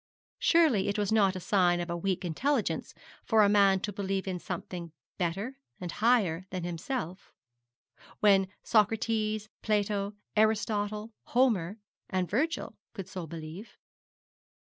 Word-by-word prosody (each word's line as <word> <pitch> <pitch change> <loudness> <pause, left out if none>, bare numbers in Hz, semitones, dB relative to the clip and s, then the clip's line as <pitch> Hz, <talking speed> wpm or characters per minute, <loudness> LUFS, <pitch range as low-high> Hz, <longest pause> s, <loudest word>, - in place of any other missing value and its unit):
Surely 315 - +4
it 200 - 0
was 205 -1 0
not 200 -3 +4
a - - -3
sign 180 -2 +3
of 175 - -3
a - - -1
weak 185 +1 -1
intelligence 240 - -1 0.3
for 220 -2 +4
a - - +6
man 200 -2 +5
to 205 +2 -4
believe 195 0 -2
in 185 -2 -2
something 175 -1 -6 0.3
better 195 +10 -2 0.2
and 175 -2 -5
higher 200 -7 +2
than 185 -2 -4
himself, 175 - -4 0.9
when 195 -2 +5 0.2
Socrates, 215 0 +1
Plato, 205 -1 0 0.2
Aristotle, 215 0 +1
Homer, 220 -7 +2 0.3
and 185 -2 0
Virgil 290 - -1 0.2
could 195 -5 -6
so 180 -3 -6
believe. 165 +6 -8
200 Hz, 130 wpm, -30 LUFS, 180-220 Hz, 0.9 s, a